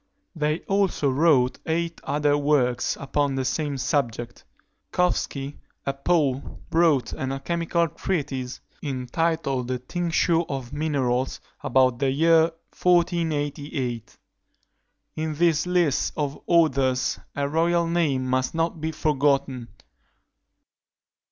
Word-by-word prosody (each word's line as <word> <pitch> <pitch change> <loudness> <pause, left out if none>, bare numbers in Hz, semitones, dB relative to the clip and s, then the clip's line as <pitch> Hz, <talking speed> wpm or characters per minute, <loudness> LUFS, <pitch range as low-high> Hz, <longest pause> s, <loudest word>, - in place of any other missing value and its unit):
They 150 +1 0
also 195 -8 +1
wrote 135 -3 +3
eight 165 +1 -1
other 145 0 +1
works 140 -5 +1
upon 140 0 0
the 130 -1 -1
same 145 0 -1
subject. 120 -4 -2 0.5
Koffstky, 145 -5 -1 0.3
a 140 - 0
Pole, 140 -2 0
wrote 160 -7 +3
an 130 0 -3
alchymical 170 +4 0
treatise, 135 -8 -3 0.2
entitled 135 0 -1
The 130 0 -1
Tincture 170 +4 +1
of 135 -2 -5
Minerals, 135 -4 0 0.2
about 130 -1 +3
the 135 - +2
year 160 +3 +4 0.3
1488. 145 - 0 1.0
In 155 -1 -2
this 165 0 +2
list 175 -6 +1
of 145 -2 -2
authors 135 -7 +2 0.2
a 140 0 0
royal 170 +3 +2
name 160 -6 +1
must 130 +3 0
not 165 -1 -1
be 160 0 -1
forgotten. 140 -5 0
145 Hz, 105 wpm, -25 LUFS, 130-165 Hz, 1.0 s, year